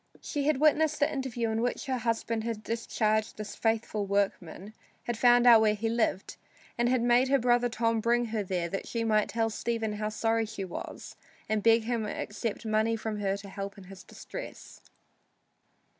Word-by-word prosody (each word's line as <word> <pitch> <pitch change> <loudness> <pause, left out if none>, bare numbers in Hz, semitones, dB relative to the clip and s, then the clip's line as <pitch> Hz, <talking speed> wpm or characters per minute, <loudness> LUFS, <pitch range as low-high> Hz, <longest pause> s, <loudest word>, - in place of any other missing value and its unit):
She 290 -2 -3
had 305 -3 +3
witnessed 310 0 +3
the 290 +1 +2
interview 245 -5 -2
in 220 +1 -1
which 245 +1 -2
her 260 -2 -1
husband 230 -1 -1
had 225 -2 -4
discharged 220 -1 -1
this 215 0 -6
faithful 220 -2 -1
workman, 200 0 -2 0.3
had 240 - -2
found 245 +1 +5
out 235 -2 +8
where 215 -1 +3
he 225 +2 -2
lived, 225 -4 -1 0.4
and 240 0 +1
had 250 -2 +2
made 245 +2 +4
her 275 +1 +4
brother 245 -1 +2
Tom 230 0 0
bring 240 +2 +2
her 220 - 0
there 180 -3 -2
that 195 +3 -5
she 230 -1 -2
might 215 -2 +2
tell 225 -1 0
Stephen 225 -1 -2
how 210 0 -2
sorry 225 +1 0
she 210 -3 -5
was 180 - -8 0.3
and 215 -1 0
beg 225 +1 +4
him 230 -1 -1
to - - -4
accept 210 +2 -4
money 220 +1 +1
from 220 -1 -4
her 195 -1 0
to 200 0 -10
help 195 0 -6
him 195 - -11
in 185 - -15
his 195 - -11
distress. - - -10
225 Hz, 195 wpm, -29 LUFS, 210-240 Hz, 0.4 s, out